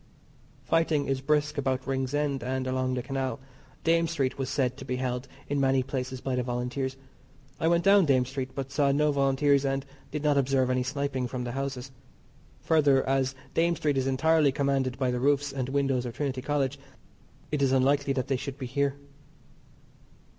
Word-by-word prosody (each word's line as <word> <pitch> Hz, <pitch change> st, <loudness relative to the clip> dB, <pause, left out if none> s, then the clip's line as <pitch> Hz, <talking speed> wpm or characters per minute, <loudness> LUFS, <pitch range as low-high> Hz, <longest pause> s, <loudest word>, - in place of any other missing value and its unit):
Fighting 160 Hz, -3 st, +1 dB
is 135 Hz, -1 st, -1 dB
brisk 150 Hz, +1 st, +1 dB
about 130 Hz, -1 st, -1 dB
Ringsend 135 Hz, +1 st, -1 dB
and 130 Hz, +1 st, -2 dB
along 130 Hz, 0 st, -1 dB
the 125 Hz, -, -3 dB
Canal. 135 Hz, +1 st, -3 dB, 0.4 s
Dame 165 Hz, 0 st, +3 dB
Street 140 Hz, -6 st, -1 dB
was 135 Hz, -2 st, -3 dB
said 135 Hz, -3 st, 0 dB
to -, -, -8 dB
be 125 Hz, -, -3 dB
held 125 Hz, 0 st, -3 dB, 0.2 s
in 145 Hz, 0 st, -1 dB
many 135 Hz, -1 st, +3 dB
places 130 Hz, -1 st, -4 dB
by 135 Hz, -, -2 dB
the 125 Hz, -, +1 dB
Volunteers. 125 Hz, +2 st, -3 dB, 0.6 s
I 160 Hz, -, +1 dB
went 170 Hz, 0 st, +3 dB
down 195 Hz, -2 st, +5 dB
Dame 130 Hz, -3 st, +3 dB
Street, 130 Hz, 0 st, -5 dB
but 135 Hz, -1 st, -4 dB
saw 140 Hz, -1 st, +2 dB
no 150 Hz, +2 st, +2 dB
Volunteers, 140 Hz, 0 st, +3 dB
and 135 Hz, 0 st, -1 dB, 0.2 s
did 150 Hz, 0 st, -4 dB
not 145 Hz, -2 st, +3 dB
observe 130 Hz, -1 st, +2 dB
any 130 Hz, 0 st, +1 dB
sniping 135 Hz, -1 st, -2 dB
from 125 Hz, 0 st, -4 dB
the 120 Hz, -, -4 dB
houses. 135 Hz, 0 st, -4 dB, 0.7 s
Further, 145 Hz, -5 st, +3 dB
as 135 Hz, 0 st, +1 dB, 0.2 s
Dame 170 Hz, +1 st, +2 dB
Street 150 Hz, -3 st, 0 dB
is 135 Hz, 0 st, 0 dB
entirely 150 Hz, +2 st, +3 dB
commanded 135 Hz, -2 st, 0 dB
by 130 Hz, -2 st, 0 dB
the 125 Hz, -, -1 dB
roofs 140 Hz, +2 st, +1 dB
and 130 Hz, -2 st, -3 dB
windows 135 Hz, -3 st, 0 dB
of 120 Hz, -, -7 dB
Trinity 135 Hz, -3 st, -2 dB
College, 140 Hz, -1 st, -1 dB, 0.7 s
it 150 Hz, -2 st, 0 dB
is 135 Hz, -2 st, +3 dB
unlikely 135 Hz, +1 st, +2 dB
that 130 Hz, -2 st, -1 dB
they 135 Hz, -, +1 dB
should 135 Hz, +1 st, -6 dB
be 135 Hz, -, -5 dB
here. 140 Hz, +2 st, 0 dB
135 Hz, 185 wpm, -28 LUFS, 130-145 Hz, 0.7 s, down